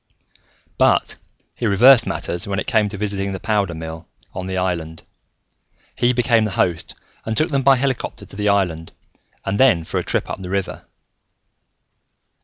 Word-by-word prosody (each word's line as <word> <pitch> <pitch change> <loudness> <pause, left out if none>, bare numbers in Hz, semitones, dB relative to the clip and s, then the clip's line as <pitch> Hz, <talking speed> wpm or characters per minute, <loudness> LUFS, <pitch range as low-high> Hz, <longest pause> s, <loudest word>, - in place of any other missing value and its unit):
But - - +2 0.4
he 120 - -2
reversed 115 +4 +6
matters 85 +2 -3
when 100 -1 -2
it - - -2
came 110 -4 +1
to 100 - -7
visiting 100 -1 -1
the 95 - -5
powder 100 -5 -1
mill 80 +1 -8 0.3
on 95 0 -5
the 95 0 -3
island: 85 -3 -3 0.9
he 120 0 +2
became 120 -2 +2
the 110 - -1
host 85 -2 0 0.3
and 110 0 -3
took 155 +2 +1
them 140 -1 +1
by 135 +1 +5
helicopter 130 -1 -2
to - - -13
the 105 0 0
island 90 -5 0 0.5
and 100 +1 -2
then 120 -11 +4
for - - -3
a - - -3
trip - - -1
up - - -6
the 90 - -7
river. 95 -1 -3
100 Hz, 170 wpm, -20 LUFS, 90-115 Hz, 0.9 s, reversed